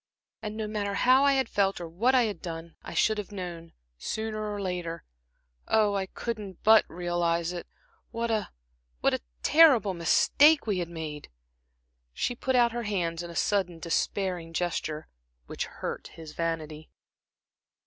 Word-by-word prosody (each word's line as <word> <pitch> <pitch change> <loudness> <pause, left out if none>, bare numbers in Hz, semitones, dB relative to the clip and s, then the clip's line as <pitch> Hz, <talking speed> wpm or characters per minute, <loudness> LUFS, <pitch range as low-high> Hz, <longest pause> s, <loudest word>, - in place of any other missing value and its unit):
And 215 0 -5
no 220 - -2
matter 205 -1 -2
how 255 +5 +5
I 280 - +5
had 265 -2 +1
felt, 195 -3 +1
or 170 - -5
what 225 +11 +2
I 250 - +5
had 215 -3 -3
done, 165 -1 -7
I - - -8
should 215 -1 +2
have 205 0 -6
known, 175 -4 -7 0.3
sooner 215 - -3
or 205 - -4
later 180 -3 -3 0.6
oh, 215 -2 +3
I 195 -1 -1
couldn't 210 -4 -6
but 220 0 +7
realize 175 -1 -1
it 175 - -6 0.4
what 230 0 -2
a 215 -2 0 0.5
what - - +3
a - - -1 0.2
terrible 265 -12 +6
mistake 285 - +4
we 205 -4 0
had 170 -1 -3
made." 155 -3 -6 0.8
She 245 - -1
put 260 +2 -1
out 240 -1 +5
her 240 +1 -3
hands 175 -6 -2
in 175 - -7
a 170 - -9
sudden, 185 -4 0
despairing 170 0 -2
gesture, 160 -3 -2 0.4
which - - -4
hurt - - -6
his 160 -2 -11
vanity. 155 -2 -3
190 Hz, 160 wpm, -28 LUFS, 170-220 Hz, 0.8 s, but